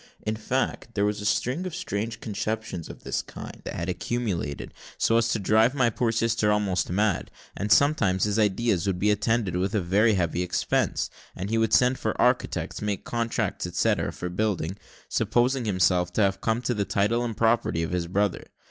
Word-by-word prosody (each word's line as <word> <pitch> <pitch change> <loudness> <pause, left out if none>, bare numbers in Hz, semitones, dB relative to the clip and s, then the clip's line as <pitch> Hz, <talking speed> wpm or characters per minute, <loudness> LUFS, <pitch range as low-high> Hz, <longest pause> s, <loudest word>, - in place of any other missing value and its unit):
In 110 0 0
fact, 120 +1 -2
there 100 -1 +2
was 105 0 -1
a - - -5
string 140 - 0
of 175 - -6
strange 110 - -3
conceptions 110 -4 -4
of - - -11
this - - -1
kind - - -10
that - - -5
had 85 - -3
accumulated, 90 -4 -3 0.2
so 115 - +3
as 115 0 +3
to 115 - +1
drive 110 +5 +3
my 120 -4 +3
poor 115 +1 0
sister 115 -1 +1
almost 100 -3 0
mad: 100 0 0 0.3
and 105 +1 -3
sometimes 115 -11 +4
his 105 +1 +1
ideas 105 -2 +1
would 95 -2 0
be 105 +3 +2
attended 105 -2 0
with 95 +3 -1
a - - +3
very 100 +5 +3
heavy 85 -1 0
expense, 90 - 0 0.2
as 95 +3 -4
he 115 - +2
would 110 -1 +1
send 125 +2 +4
for - - -2
architects, - - +1
make 105 -2 -2
contracts, 115 -1 -2
etcetera, - - +1
for 90 - -5
building, 95 -2 -1 0.3
supposing 120 +3 +1
himself 90 -3 +2
to 110 - +1
have 95 0 0
come 115 +2 0
to 125 - 0
the 105 -3 0
title 105 +5 +1
and 115 -3 -4
property 115 -7 +2
of 80 - -3
his 90 -2 -1
brother. 100 +2 0
105 Hz, 190 wpm, -26 LUFS, 95-115 Hz, 0.3 s, sometimes